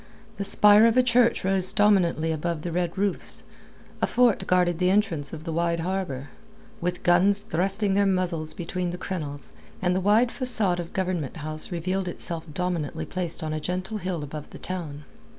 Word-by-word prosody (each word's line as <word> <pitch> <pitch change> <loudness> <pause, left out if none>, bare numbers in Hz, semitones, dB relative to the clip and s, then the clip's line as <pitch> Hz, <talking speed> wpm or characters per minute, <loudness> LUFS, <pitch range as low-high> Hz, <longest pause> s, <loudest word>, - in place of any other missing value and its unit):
The 200 - -2
spire 210 +2 +6
of 230 +2 +2
a 255 - +6
church 240 -3 +3
rose 190 -1 +1
dominantly 180 -6 +3
above 160 0 -2
the 175 - -3
red 175 +1 -2
roofs, 200 -1 -2 0.6
a - - +3
fort 245 -4 +2
guarded 180 -2 +2
the 180 0 +3
entrance 185 -8 +1
of 155 -1 -7
the 165 -1 -4
wide 170 0 0
harbour, 170 -7 -3 0.5
with 180 +1 -2
guns 195 +4 +4
thrusting 195 +4 0
their 200 0 +3
muzzles 175 -4 -1
between 180 +1 -3
the 175 - -5
crenels, 145 - -6 0.3
and 180 0 +1
the 185 - 0
wide 220 +5 +4
facade 220 -9 0
of 170 -1 -6
Government 180 -7 -2
House 155 +2 -5
revealed 185 +2 -2
itself 170 -1 -4
dominantly 175 -2 -2
placed 175 -2 -3
on 155 0 -2
a 155 - -2
gentle 185 +6 -3
hill 180 -5 -3
above 150 +1 -7
the - - -10
town. 160 -6 -5
180 Hz, 180 wpm, -25 LUFS, 165-195 Hz, 0.6 s, spire